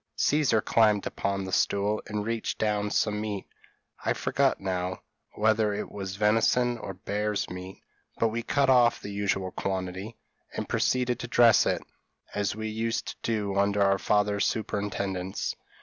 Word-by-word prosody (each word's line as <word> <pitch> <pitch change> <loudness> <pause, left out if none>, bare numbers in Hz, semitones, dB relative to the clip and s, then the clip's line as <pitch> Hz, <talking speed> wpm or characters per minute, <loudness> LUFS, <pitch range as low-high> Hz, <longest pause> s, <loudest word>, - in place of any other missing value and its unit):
Caesar 140 -7 +2
climbed 105 -3 +3
upon 100 0 -2
the 95 - -6
stool, 100 +3 +1
and 105 -1 -3
reached 115 0 -2
down 105 -1 0
some 105 0 0
meat 105 -3 -4 0.6
I - - +2
forget - - +1
now 90 -1 -3 0.3
whether 110 -1 +2
it 105 - -5
was 95 -2 -5
venison 115 +3 +2
or 95 -3 -6
bear's 105 +2 -2
meat; 90 +1 -8 0.3
but 115 - +2
we 115 +2 -2
cut 140 +3 +1
off 120 -2 +5
the 100 - -7
usual 100 -2 -1
quantity, 95 +4 -4 0.4
and - - -3
proceeded 125 -1 +1
to 120 - -5
dress 115 -1 +5
it, - - 0 0.5
as 105 0 -1
we 110 0 -4
used 115 +1 -2
to - - -6
do 105 -4 -1
under 100 0 +3
our 95 0 +3
father's 105 0 +2
superintendence. 100 -3 -2
105 Hz, 155 wpm, -28 LUFS, 100-110 Hz, 0.6 s, off